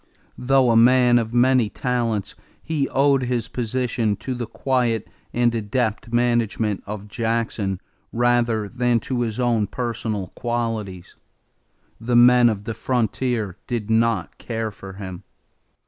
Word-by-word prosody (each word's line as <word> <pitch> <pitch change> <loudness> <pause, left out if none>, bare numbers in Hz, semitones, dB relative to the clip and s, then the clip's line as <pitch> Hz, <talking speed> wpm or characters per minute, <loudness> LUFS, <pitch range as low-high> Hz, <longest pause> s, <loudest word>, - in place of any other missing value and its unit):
Though 130 -1 +3
a - - +3
man 125 +1 +5
of 115 -1 -3
many 125 -2 +3
talents, 115 -6 -2 0.3
he 150 -4 -1
owed 135 0 +3
his 125 -3 -1
position 120 -2 -1
to 130 - -5
the 120 -2 -4
quiet 120 -4 0 0.2
and 120 -1 +2
adept 115 +1 -2
management 120 -3 +1
of 105 0 -6
Jackson 110 -3 -2 0.3
rather 120 -2 +1
than 120 +1 +1
to 125 +2 -2
his 115 0 -2
own 115 -4 +1
personal 110 -4 -3
qualities. 115 -6 -4 0.8
The 120 +2 -1
men 120 0 +7
of 105 -3 -3
the 115 - -4
frontier 120 -5 -1
did 115 -3 -3
not 110 -4 +1
care 115 -2 -3
for 95 -1 -10
him. 95 -2 -8
115 Hz, 130 wpm, -22 LUFS, 110-125 Hz, 0.8 s, men